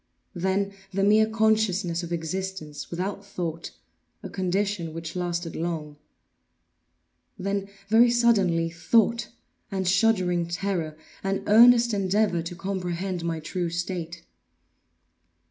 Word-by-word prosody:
Then 190 +2 -1 0.2
the 195 0 0
mere 215 +2 +5
consciousness 215 -6 +1
of 170 -1 -7
existence, 170 -2 -4
without 195 +3 -3
thought—a 170 -4 -8
condition 190 -3 -1
which 165 0 -6
lasted 175 -2 -3
long. 160 -3 -3 1.4
Then, 200 +1 -2 0.2
very 230 +3 +6
suddenly, 200 -9 +3
thought, 225 +7 +2 0.4
and 190 -2 -2
shuddering 185 -3 +2
terror, 170 -3 -2 0.3
and 195 0 -1
earnest 235 +2 +6
endeavor 195 -2 +1
to 170 +2 -6
comprehend 185 -1 -3
my 165 -1 -2
true 175 +2 -3
state. 170 -1 -4
185 Hz, 105 wpm, -26 LUFS, 170-200 Hz, 1.4 s, very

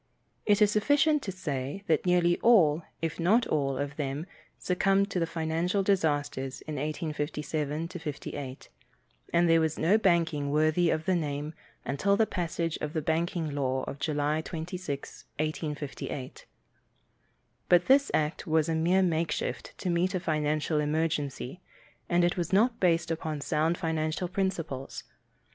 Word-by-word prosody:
It 210 0 +5
is 205 - +4
sufficient 290 +7 +3
to 195 - -4
say 150 -1 -4
that 165 +1 +1
nearly 175 -1 +3
all, 170 -10 +5 0.2
if 165 0 -2
not 215 +8 +4
all, 135 -3 0
of 145 +1 -4
them 145 +1 -3 0.3
succumbed 195 +2 +1
to 180 - 0
the 165 - 0
financial 165 +4 0
disasters 145 -8 0
in 155 -2 -6
1857 150 0 -3
58, 145 -5 -6 0.6
and 170 0 +4
there 165 0 +5
was 160 -1 0
no 200 +7 +3
banking 165 -7 +2
worthy 155 +3 +3
of 160 0 0
the 190 - +2
name 150 -2 -2 0.3
until 195 +10 +1
the 220 - +4
passage 170 -4 -2
of 150 0 -3
the 160 - -1
banking 165 0 -1
law 130 -2 -1
of 140 - -6
July 150 +1 0
26, 165 -3 -6
1858. 150 -3 -4 1.2
But 175 0 +5
this 280 +2 +5
act 155 +4 -1
was 160 0 +2
a 165 - 0
mere 175 +4 +3
makeshift 165 -2 -2
to 180 - -2
meet 175 +2 +1
a - - +1
financial 155 -2 0
emergency, 150 -1 -2 0.5
and 175 0 +3
it 175 - +2
was 175 -2 -2
not 230 +5 +3
based 170 -2 +2
upon 155 -2 -3
sound 160 +4 0
financial 160 +1 -1
principles. 170 -8 -3
160 Hz, 145 wpm, -29 LUFS, 150-180 Hz, 1.2 s, It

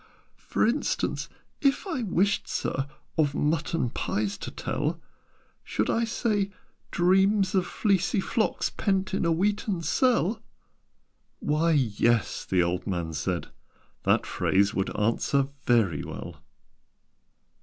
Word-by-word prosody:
"For - - 0
instance, 240 +7 -1 0.3
if 275 +5 +2
I 330 -10 -2
wished, 200 -1 +1
Sir, 135 +1 -2 0.3
Of 145 -2 +2
mutton 155 -3 0
pies 105 -1 -1
to - - -5
tell, - - -2 0.6
Should - - -1
I 230 0 +1
say 215 -3 0 0.4
'dreams 190 +2 +3
of 185 -2 +2
fleecy 200 -1 +1
flocks 215 +3 0
Pent 195 -1 0
in 190 - 0
a 170 - +3
wheaten 195 +1 0
cell'?" 225 - +2 1.0
"Why, 155 +3 +1
yes," 120 -4 +1
the 90 -2 +2
old 90 +3 -2
man 85 -4 -2
said: 85 +4 -2 0.5
"that - - +2
phrase 100 +1 +2
Would 95 - 0
answer 135 +5 +1 0.2
very 110 -11 +3
well. 85 -4 -7
165 Hz, 120 wpm, -27 LUFS, -, 1.0 s, dreams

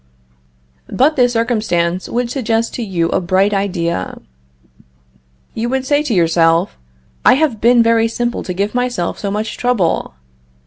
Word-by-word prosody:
But 290 +5 +2
this 245 -2 +2
circumstance 210 -7 -1
would 240 0 -2
suggest 230 -3 -1
to - - -4
you 175 -6 -1
a - - 0
bright 190 +3 +1
idea. 175 - -2 1.3
You 235 +2 -3
would 265 0 -1
say 290 +2 +2
to 295 -6 -2
yourself: 165 +1 +2 0.5
"I 250 - +6
have 275 -7 0
been 235 +1 +5
very 230 0 +3
simple 240 +1 -2
to 180 - -3
give 200 +3 -1
myself 245 -8 -2
so 200 - -3
much 210 +2 -3
trouble. 205 - 0
225 Hz, 145 wpm, -16 LUFS, 180-245 Hz, 1.3 s, I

